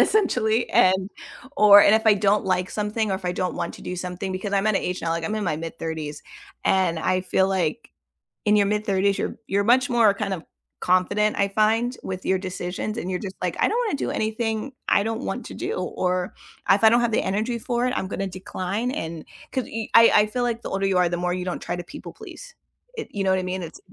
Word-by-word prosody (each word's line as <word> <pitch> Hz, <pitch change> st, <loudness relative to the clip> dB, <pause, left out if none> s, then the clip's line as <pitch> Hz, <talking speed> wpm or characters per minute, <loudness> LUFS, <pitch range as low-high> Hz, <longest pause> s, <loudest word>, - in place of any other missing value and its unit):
essentially, 245 Hz, -, +2 dB
and 190 Hz, +1 st, +3 dB, 0.5 s
or 205 Hz, -2 st, +9 dB
and 210 Hz, -, +6 dB
if 220 Hz, 0 st, +1 dB
I 210 Hz, -, +7 dB
don't 205 Hz, +1 st, +2 dB
like 185 Hz, -1 st, 0 dB
something 210 Hz, 0 st, -2 dB
or -, -, +1 dB
if 190 Hz, -, -6 dB
I 180 Hz, -, 0 dB
don't 180 Hz, 0 st, -2 dB
want 170 Hz, -, -3 dB
to -, -, -12 dB
do 180 Hz, -, -5 dB
something, 180 Hz, +2 st, -4 dB
because 195 Hz, +2 st, -4 dB
I'm 200 Hz, +1 st, +1 dB
at 215 Hz, -, +2 dB
a -, -, +2 dB
age 180 Hz, -2 st, -4 dB
now, 165 Hz, -, -1 dB
like 165 Hz, 0 st, -2 dB
I'm 210 Hz, -, -2 dB
in 215 Hz, -1 st, -2 dB
my 155 Hz, -4 st, -1 dB
mid-thirties, 160 Hz, -2 st, -5 dB, 0.4 s
and 185 Hz, -3 st, +2 dB
I 185 Hz, +3 st, +1 dB
feel 190 Hz, +1 st, +1 dB
like 195 Hz, +5 st, -1 dB, 0.6 s
in 210 Hz, 0 st, +4 dB
your 205 Hz, -1 st, +4 dB
mid-thirties 200 Hz, -2 st, +1 dB
you're -, -, -3 dB
you're 200 Hz, +1 st, +1 dB
much 255 Hz, +5 st, +3 dB
more 230 Hz, -4 st, +4 dB
kind 195 Hz, -1 st, -3 dB
of 170 Hz, -, -6 dB, 0.4 s
confident, 205 Hz, +4 st, +2 dB
I 200 Hz, -, +3 dB
find, 225 Hz, +5 st, +1 dB
with 185 Hz, -1 st, -5 dB
your 190 Hz, -, +1 dB
decisions 185 Hz, +3 st, -4 dB
and 185 Hz, -, -5 dB
you're 180 Hz, -1 st, -2 dB
just 190 Hz, -2 st, -7 dB
like, -, -, -1 dB
"I -, -, +4 dB
don't 470 Hz, -, 0 dB
wanna 290 Hz, -, -1 dB
do -, -, -2 dB
anything 220 Hz, +3 st, -2 dB, 0.2 s
I -, -, +4 dB
don't 225 Hz, +1 st, -3 dB
want 250 Hz, -, -4 dB
to -, -, -9 dB
do," -, -, -3 dB
or 180 Hz, 0 st, -2 dB, 0.4 s
if 200 Hz, +2 st, +4 dB
I 220 Hz, -, +9 dB
don't 235 Hz, +2 st, +4 dB
have 240 Hz, -1 st, +1 dB
the 220 Hz, -, +2 dB
energy 215 Hz, +5 st, -1 dB
for 240 Hz, +1 st, -1 dB
it, 250 Hz, -, -1 dB
I'm 190 Hz, -, -2 dB
gonna 195 Hz, 0 st, -3 dB
decline 190 Hz, +4 st, -4 dB
and 165 Hz, -, -5 dB, 0.3 s
'cause 260 Hz, -, -1 dB
y 225 Hz, -1 st, -5 dB
I 230 Hz, 0 st, +8 dB
I 210 Hz, -, +6 dB
feel 245 Hz, +3 st, -2 dB
like 235 Hz, -1 st, -1 dB
the -, -, -6 dB
older 195 Hz, 0 st, -1 dB
you 195 Hz, -1 st, +2 dB
are, 180 Hz, -1 st, +3 dB
the 175 Hz, -, -2 dB
more 180 Hz, 0 st, -1 dB
you 180 Hz, 0 st, -3 dB
don't 180 Hz, -, -4 dB
try -, -, -3 dB
to 175 Hz, -, -6 dB
people 290 Hz, -, -10 dB
please, -, -, -11 dB, 0.4 s
it 450 Hz, -, -5 dB
you 200 Hz, -, -2 dB
know 190 Hz, -, +2 dB
what 190 Hz, -, +2 dB
I -, -, -3 dB
mean? 185 Hz, 0 st, -3 dB
It's 165 Hz, -, -9 dB
195 Hz, 250 wpm, -24 LUFS, 185-220 Hz, 0.6 s, or